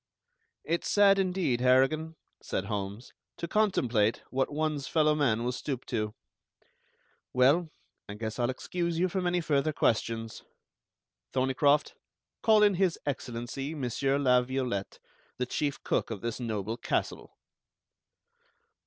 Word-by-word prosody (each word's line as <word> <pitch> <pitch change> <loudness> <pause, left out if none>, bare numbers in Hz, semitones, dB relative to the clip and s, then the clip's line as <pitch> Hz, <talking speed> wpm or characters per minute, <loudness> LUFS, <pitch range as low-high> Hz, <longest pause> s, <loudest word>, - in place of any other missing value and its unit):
"It's 170 +2 -1
sad, 200 -1 +5
indeed, 180 -10 0
Harrigan," 135 +6 +3 0.3
said 95 - -3
Holmes, 100 +2 -5 0.2
"to 170 - -4
contemplate 125 - +1
what 135 +2 0
one's 150 -2 -1
fellow 155 -1 +3
man 120 -7 +1
will 125 - 0
stoop 130 0 -4
to. 105 -2 -1 1.2
Well, 145 +7 +4 0.4
I 100 - -5
guess 110 +2 -5
I'll 120 0 +1
excuse 170 +5 -2
you 180 +2 +2
from 185 0 -1
any 175 0 +1
further 155 -1 +1
questions. 115 -4 -1 0.9
Thorneycroft, 135 +3 +2 0.5
call 215 -1 +5
in 205 -1 +5
His 185 -2 +1
Excellency, 135 +2 -4
Monsieur 135 0 0
La 125 -3 +4
Violette, 125 -6 -3 0.4
the 125 - -1
Chief 145 +2 -2
Cook - - 0
of 110 -4 -5
this 115 0 -3
noble 110 -2 -3
castle." 120 - -3
135 Hz, 125 wpm, -29 LUFS, 120-160 Hz, 1.2 s, sad